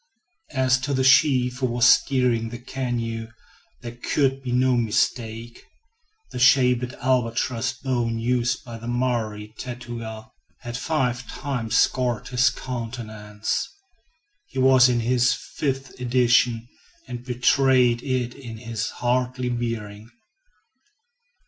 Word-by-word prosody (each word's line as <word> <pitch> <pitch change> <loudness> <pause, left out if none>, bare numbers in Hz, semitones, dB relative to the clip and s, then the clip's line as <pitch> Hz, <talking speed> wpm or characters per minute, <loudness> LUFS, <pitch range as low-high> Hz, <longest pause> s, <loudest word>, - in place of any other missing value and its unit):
As 130 0 +3
to 140 +1 -2
the 130 - +1
chief 130 -2 +4
who 130 - +1
was 120 0 +2
steering 125 -5 +3
the 120 - -7
canoe, 120 -3 -4 0.5
there 120 0 -8
could 135 +1 0
be 130 -2 -5
no 125 +1 +3
mistake. 115 0 -1 0.7
The - - -5
sharpened 125 -1 +4
albatross 125 0 0
bone 120 -3 -2
used 120 +2 0
by 115 -2 -8
the 115 - -8
Maori 115 -4 -2
tattooer, 120 -3 -7 0.4
had 120 -1 -6
five 125 -3 -1
times 125 -6 -2
scored 125 -3 +1
his 125 +1 +3
countenance. 110 -4 -4 0.8
He - - -11
was 130 -1 +6
in 120 -1 +1
his 120 +1 +2
fifth 135 -2 -4
edition, 120 -1 +2 0.4
and 120 0 -7
betrayed 125 -1 +3
it 125 -2 -2
in 120 -5 -9
his 115 -1 -4
haughty 125 +1 -1
bearing. 115 -3 -4
125 Hz, 115 wpm, -24 LUFS, 115-130 Hz, 0.8 s, was